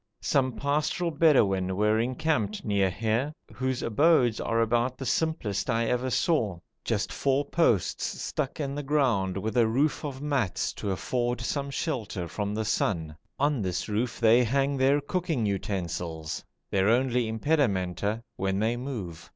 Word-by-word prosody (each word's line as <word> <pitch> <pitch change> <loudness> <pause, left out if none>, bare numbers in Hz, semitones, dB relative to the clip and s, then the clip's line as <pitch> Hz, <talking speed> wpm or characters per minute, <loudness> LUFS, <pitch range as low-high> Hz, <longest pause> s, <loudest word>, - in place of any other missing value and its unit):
Some 130 -2 +2
pastoral 150 +5 0
Bedouin 100 - +3
were 105 +2 +2
encamped 125 -3 -1
near 100 -2 +2
here, 115 - -1 0.2
whose 130 -1 -2
abodes 125 -1 +3
are 115 - 0
about 120 +3 +1
the 135 - -6
simplest 120 - -1
I 115 0 +2
ever 125 +2 0
saw: 115 - +1 0.3
just - - -1
four 140 +1 +1
posts 130 - +1
stuck 145 -1 -3
in 140 -2 -2
the 145 - -3
ground 125 -10 +1
with 110 +4 -3
a 120 -2 +4
roof 140 +9 +1
of 140 -3 -5
mats 140 -9 -1
to 100 - -4
afford 120 +6 -1
some 140 +3 -2
shelter 115 - -3
from 105 +3 -3
the 110 0 -1
sun; 80 -7 -1 0.2
on 145 -3 +1
this 90 -3 -2
roof 110 +2 -2
they 115 +2 +5
hang 135 +4 +1
their 135 +2 +3
cooking 160 -5 -1
utensils, 85 -5 -3 0.3
their 95 +1 +3
only 125 0 +2
impedimenta 110 - 0
when 95 0 0
they 110 +4 +1
move. 110 -11 -6
120 Hz, 150 wpm, -27 LUFS, 100-140 Hz, 0.3 s, they